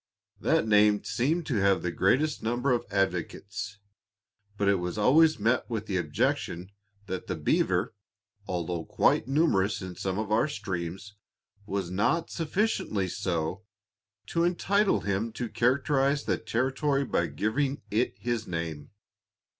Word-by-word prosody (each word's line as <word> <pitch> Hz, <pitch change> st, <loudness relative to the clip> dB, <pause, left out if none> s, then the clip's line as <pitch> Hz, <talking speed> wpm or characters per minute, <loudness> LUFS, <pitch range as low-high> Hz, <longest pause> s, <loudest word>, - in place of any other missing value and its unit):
That -, -, +2 dB
name 105 Hz, -1 st, +4 dB
seemed 130 Hz, -, 0 dB
to 130 Hz, -7 st, -1 dB
have 100 Hz, -2 st, +3 dB
the 90 Hz, -, -1 dB
greatest 135 Hz, -, +1 dB
number 120 Hz, +4 st, 0 dB
of 120 Hz, -, 0 dB
advocates, 95 Hz, +1 st, -2 dB, 0.8 s
but 100 Hz, -, +1 dB
it 100 Hz, -2 st, +3 dB
was 90 Hz, +3 st, -4 dB
always 155 Hz, +9 st, +5 dB
met 115 Hz, +5 st, +1 dB
with 110 Hz, -2 st, -3 dB
the 95 Hz, -3 st, -1 dB
objection 90 Hz, +1 st, -1 dB, 0.3 s
that 95 Hz, -2 st, -5 dB
the 90 Hz, -, -2 dB
beaver, 75 Hz, -2 st, +1 dB, 0.5 s
although 85 Hz, -2 st, -2 dB
quite 110 Hz, -, +2 dB
numerous 130 Hz, -, +2 dB
in 95 Hz, -1 st, -7 dB
some 95 Hz, +1 st, -3 dB
of 105 Hz, -1 st, -3 dB
our 115 Hz, +7 st, +3 dB
streams, 95 Hz, -, -5 dB, 0.5 s
was 95 Hz, -3 st, -2 dB
not 160 Hz, -, +1 dB
sufficiently 165 Hz, -, 0 dB
so 90 Hz, -1 st, -2 dB, 0.6 s
to 170 Hz, -, 0 dB
entitle 195 Hz, +4 st, +2 dB
him 100 Hz, +3 st, -1 dB
to 120 Hz, +1 st, -3 dB
characterize 135 Hz, +4 st, +1 dB
the -, -, 0 dB
territory 135 Hz, +5 st, 0 dB
by -, -, 0 dB
giving 135 Hz, +7 st, -1 dB
it 115 Hz, +4 st, 0 dB
his 120 Hz, -2 st, -2 dB
name. 85 Hz, -4 st, -4 dB
105 Hz, 140 wpm, -28 LUFS, 95-135 Hz, 0.8 s, always